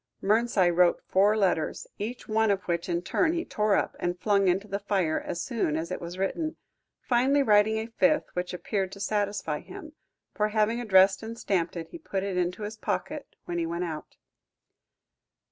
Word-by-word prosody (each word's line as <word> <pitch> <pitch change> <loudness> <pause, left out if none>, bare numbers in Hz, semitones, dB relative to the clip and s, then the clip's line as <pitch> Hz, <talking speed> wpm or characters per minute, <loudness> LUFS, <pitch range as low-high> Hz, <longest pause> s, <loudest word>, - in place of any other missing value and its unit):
Mernside 205 -4 +3
wrote 175 -1 +4
four 205 +3 +3
letters, 180 -6 0
each 230 +5 -5
one 220 0 +2
of 195 -2 +1
which 170 0 -2
in 170 0 -1
turn 320 - +1
he 340 0 -2
tore 210 -1 +1
up - - 0
and 175 0 -2
flung 200 -1 +2
into 190 +3 +1
the 200 0 -3
fire 190 -6 0
as 175 - -4
soon 215 - -1
as 165 +2 -4
it - - -4
was 175 +1 -6
written, 310 - -2 0.5
finally 265 +3 +3
writing 215 -1 +4
a 220 - -2
fifth, 275 +6 +2
which 180 0 -3
appeared 190 +1 -2
to 200 - -10
satisfy 200 -7 -1
him, 310 -1 -11 0.4
for, 210 - +1
having 215 +2 +1
addressed 190 -3 +5
and 225 +1 -7
stamped 180 -6 -1
it, 165 -1 -6
he - - -9
put 190 -1 -3
it 195 -2 -2
into 180 +3 -1
his 215 +1 -5
pocket 290 +6 -4
when 175 0 -3
he 165 - 0
went 170 +2 -2
out. 160 -3 -6
200 Hz, 190 wpm, -27 LUFS, 180-220 Hz, 0.5 s, addressed